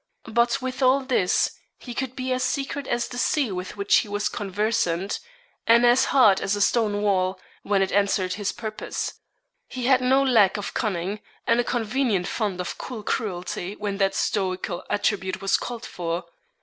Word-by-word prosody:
But, 240 +3 +2
with 260 +1 -4
all 260 +1 +4
this, 255 -9 +2 0.3
he 245 - -8
could 260 +1 -3
be 260 -1 -1
as 255 - -1
secret 275 +1 -2
as 240 0 0
the 245 0 -6
sea 270 -4 +1
with 185 +2 -5
which 200 0 +4
he 225 - +1
was 205 0 -1
conversant, 200 -2 -1 0.5
and 235 +1 +6
as 245 +2 +5
hard 215 -8 +5
as 195 - 0
a 205 - -2
stonewall, 205 -4 +1 0.2
when 200 -1 +2
it 190 - -2
answered 200 -2 +1
his 205 0 -2
purpose. 215 -2 -4 0.5
He 255 -2 -5
had 260 0 +4
no 265 +2 +4
lack 225 -7 +4
of 205 - -5
cunning, 200 -2 -2 0.3
and 230 +1 +3
a - - +3
convenient 230 -5 0
fund 205 -5 -2
of 180 - -4
cool 235 -5 -6
cruelty 185 -3 -3
when 205 -2 -3
that 195 0 +2
stoical 185 -3 -1
attribute 195 -2 0
was 195 0 +2
called 245 0 -4
for. 170 0 -4
210 Hz, 175 wpm, -24 LUFS, 195-250 Hz, 0.5 s, and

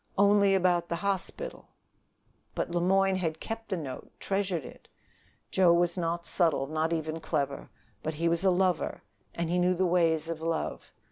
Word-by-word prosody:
Only 200 0 +5
about 175 -2 +2
the 170 - 0
hospital 200 - -3 0.9
but - - -2
Le 175 0 0
Moyne 195 +1 +3
had 160 -3 -2
kept 225 0 -6
the 190 - -1
note, 140 -6 -7
treasured 195 -6 -1
it! - - -13 0.6
Joe 185 -2 +5
was 175 0 +2
not 170 -1 -2
subtle, 165 -6 +1
not 155 +3 -1
even 160 -1 -2
clever; 140 -3 -2 0.3
but 155 +3 -3
he 165 +2 0
was 170 +2 +1
a 190 - +5
lover, 180 -1 +1 0.3
and 170 0 -1
he 180 - +2
knew 180 +1 +3
the 185 +1 +1
ways 165 -3 +2
of 165 -1 -4
love. 165 0 -3
175 Hz, 175 wpm, -29 LUFS, 165-190 Hz, 0.9 s, Only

